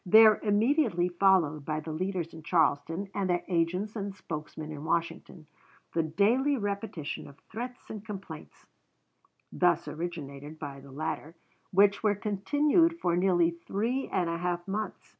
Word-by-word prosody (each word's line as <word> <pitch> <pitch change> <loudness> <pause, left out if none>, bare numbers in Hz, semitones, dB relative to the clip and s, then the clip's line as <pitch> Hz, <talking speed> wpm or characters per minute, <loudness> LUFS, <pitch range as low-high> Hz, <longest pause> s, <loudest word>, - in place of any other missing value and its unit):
There 215 +2 +7
immediately 215 - +2
followed 175 -5 +3
by 155 +2 -2
the 160 - -6
leaders 180 0 -2
in 160 - -9
Charleston, 165 +3 +1
and 195 -2 -1
their 175 -1 +1
agents 180 +5 0
and 200 -2 -4
spokesmen 155 -3 -6
in 150 -1 -7
Washington, 165 0 -2 0.5
the 165 - +2
daily 225 - +2
repetition 200 - -4
of 140 0 -14
threats 245 +3 -6
and 215 -2 -7
complaints 195 -7 -9 0.9
(thus 175 -1 +2
originated 150 -3 -6
by 145 -3 -7
the 135 0 -13
latter), 155 +2 -4 0.3
which 200 +1 +4
were 210 -2 +3
continued 290 - +2
for 175 -1 +1
nearly 175 -2 +3
three 220 +10 -2
and 180 -2 0
a 170 0 -2
half 175 0 -2
months. 210 +2 -4
180 Hz, 145 wpm, -29 LUFS, 160-205 Hz, 0.9 s, There